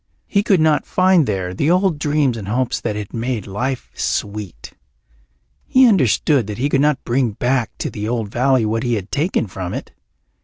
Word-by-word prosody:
He 200 - +1
could 200 -3 +2
not 155 -2 +2
find 185 -4 +3
there 95 -3 -2
the 145 - 0
old 180 -3 +2
dreams 145 -4 +1
and 105 -4 -7
hopes 120 +3 -1
that 105 - -2
had 105 -2 -6
made 115 -2 -3
life 125 +7 -4
sweet. 105 -3 -4 0.9
He 260 0 +5
understood 140 - +2
that 105 - -5
he 135 +4 0
could 135 -1 +2
not 150 -2 +1
bring 120 -2 0
back 125 +1 0
to - - -4
the 105 0 -4
old 115 -4 -2
valley 125 +1 +2
what 110 +1 -1
he 120 -1 0
had 100 -2 -5
taken 155 -2 0
from 95 -2 -6
it. - - -7
125 Hz, 190 wpm, -19 LUFS, 105-150 Hz, 0.9 s, He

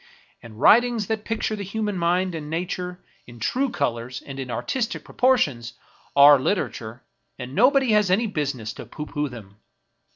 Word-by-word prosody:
And 110 -2 -13
writings 235 - +4
that 220 +1 -3
picture 225 -1 -2
the 205 - -7
human 210 +1 -3
mind 180 +1 0
and 155 -2 -6
nature, 180 +2 -4 0.3
in 120 -1 -13
true 260 - 0
colors 125 - -3
and 135 -1 -8
in 130 -2 -5
artistic 235 - -3
proportions, 145 - +1 0.4
are 140 0 +8
literature, 120 - -3 0.3
and 125 0 -7
no 235 - +6
body 270 -4 +2
has 210 -3 +3
any 200 +6 +2
business 140 - -3
to - - -10
pooh 150 - -7
pooh 150 -1 -3
them. 105 -5 -12
170 Hz, 165 wpm, -23 LUFS, 125-215 Hz, 0.4 s, are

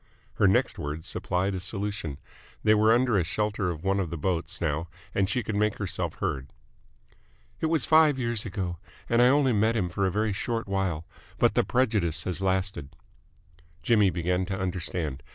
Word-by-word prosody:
Her 100 - +5
next 95 - +2
words 75 +2 -5
supplied 95 +2 0
a 95 - -2
solution. 100 -6 -3 0.5
They 110 - +5
were 110 +1 +4
under 115 -5 +3
shelter 105 +2 -1
of 80 -2 -5
one 95 +1 +1
of 90 -4 -1
the 85 - -4
boats 85 0 -1
now 80 +1 -1 0.3
and 95 -1 +1
she 125 +2 0
could 105 - -4
make 105 0 +1
herself 95 -5 -3
heard. 65 -1 -3 1.1
"It 160 - 0
was 160 -1 +1
five 155 -3 +5
years 115 -4 0
ago, 90 -4 -4 0.3
and 115 0 +3
I 125 - +7
only 135 -1 +4
met 110 +2 +2
him 95 -6 0
for 95 +2 0
a - - 0
very 105 +1 0
short 115 +2 -2
while, 95 -5 -1 0.3
but - - +3
the - - +3
prejudice 105 -11 +1
has 90 0 -3
lasted." 95 -6 -1 0.9
Jimmy 105 -4 +4
began 90 +1 0
to 95 -1 -3
understand. 90 -6 -3
95 Hz, 180 wpm, -27 LUFS, 85-110 Hz, 1.1 s, I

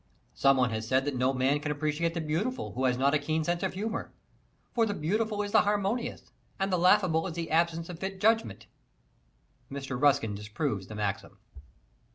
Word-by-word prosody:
Some 135 0 +4
one 125 -2 +2
has 110 0 -3
said 130 +2 +2
that 145 -2 -2
no 130 +1 +2
man 135 +2 +1
can 150 0 -3
appreciate 155 +3 -1
the 170 - -1
beautiful 175 +12 -2
who 130 +1 -1
has 125 -1 +2
not 140 +2 +2
a 150 - +3
keen 155 +2 -1
sense 175 +2 -1
of 190 -1 -2
humor. 215 +3 -3 0.6
For 230 -2 +2
the 205 - -2
beautiful 210 +6 -1
is 205 - -5
the - - +6
harmonious, 205 +3 -1 0.4
and 195 0 0
the 180 - +2
laughable 180 -2 +4
is 170 - -5
the 165 -2 -4
absence 165 0 +1
of 175 -2 -8
fit 190 +1 -4
adjustment. 190 - +1 1.1
Mr. 135 -2 -5
Ruskin 140 -7 +3
disproves 105 - -3
the 110 - -8
maxim. 100 -2 -3
155 Hz, 195 wpm, -29 LUFS, 130-190 Hz, 1.1 s, the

